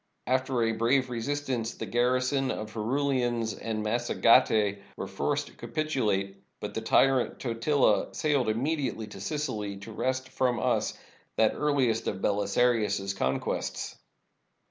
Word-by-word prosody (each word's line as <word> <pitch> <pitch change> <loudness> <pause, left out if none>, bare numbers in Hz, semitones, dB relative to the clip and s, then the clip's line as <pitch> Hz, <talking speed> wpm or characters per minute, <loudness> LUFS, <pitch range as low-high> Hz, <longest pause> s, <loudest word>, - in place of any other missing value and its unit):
After 130 -1 +1
a 115 - +2
brave 125 +3 +1
resistance, 120 -1 -2
the - - -5
garrison 130 +2 +1
of 110 -3 -4
Herulians 120 -1 0
and 110 -1 -4
Mas 120 +3 -1
sagetae 110 -4 +4 0.2
were - - -3
forced - - -1
to - - -14
capitulate. 110 -11 -1 0.2
But - - -5
the - - -3
tyrant 135 -2 +3
Tot 115 -1 -4
ila 140 -8 +3
sailed 145 -6 +1
immediately 130 0 -1
to 105 -2 -10
Sicily, 105 -6 -3
to 100 +3 -9
wrest 130 +4 -1
from 125 -2 0
us - - 0 0.4
that 110 -1 +4
earliest 130 -7 +1
of - - -2
Belisarius's 100 -1 +1
conquests. 65 -8 -2
120 Hz, 135 wpm, -28 LUFS, 110-130 Hz, 0.4 s, sagetae